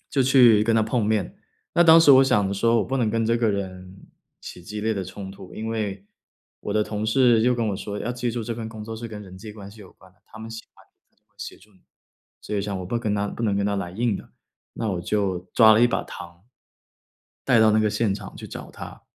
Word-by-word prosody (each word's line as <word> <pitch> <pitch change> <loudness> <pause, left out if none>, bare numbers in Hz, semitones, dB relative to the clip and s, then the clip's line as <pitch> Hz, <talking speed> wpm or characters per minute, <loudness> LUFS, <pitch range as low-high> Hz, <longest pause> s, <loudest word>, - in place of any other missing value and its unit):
就 135 - +2
去 125 -5 +6
跟 115 +1 +1
他 110 - +3
碰 110 0 0
面。 105 -3 -1 0.4
那 175 - +5
当 165 -1 +8
时 145 -4 +7
我 135 0 +7
想 105 -6 +2
着 95 - -2
说 115 +4 +2
我 105 - +1
不 135 - -2
能 120 -4 +1
跟 115 0 0
这 115 +1 +2
个 115 -2 +1
人， 95 -1 -6 0.3
起 90 - -10
激 105 +3 -6
烈 110 +1 0
的 100 - -3
冲 95 +1 -8
突。 95 -1 -12
因 110 - -5
为， 100 -3 -4 0.5
我 100 - -4
的 105 - +2
同 105 0 -4
事 120 -1 +4
就 125 +1 +3
跟 115 -2 -1
我 100 - -2
说： 105 +1 -6
“要 120 - -3
记 120 0 -2
住 120 0 -4
这 115 +1 -4
份 110 -1 -6
工 110 -1 -9
作 110 +1 -6
是 115 +1 -7
跟 105 -2 -8
人 95 -1 -12
际 105 +2 -9
关 100 -2 -11
系 105 +1 -15
有 95 - -14
关 95 -1 -21
的， - - -35
他 110 - -14
们 110 +1 -8
喜 115 0 -8
欢 - - -21 0.3
你 - - -42
就 - - -41
会 - - -44
协 - - -7
助 105 - -22
你。” 95 - -27 0.6
所 105 - -6
以 100 - 0
想 100 -1 -3
我 90 - -6
不 120 +4 -2
跟 110 -3 -1
他 100 0 -1
不 115 - -6
能 105 -3 +1
跟 100 - 0
他 100 - -1
来 95 -3 -4
硬 110 +2 -1
的， - - -12 0.4
那 115 - -3
我 90 -2 -3
就 95 0 -1 0.2
抓 110 -2 +7
了 110 - +4
一 120 - +6
把 - - -1
糖， 85 +1 -11 1.0
带 - - +4
到 110 - +5
那 110 - +3
个 110 - +2
现 105 -1 0
场 - - -9
去 - - -9
找 - - -9
他。 - - -11
110 Hz, 290 characters per minute, -24 LUFS, 100-115 Hz, 1.0 s, 当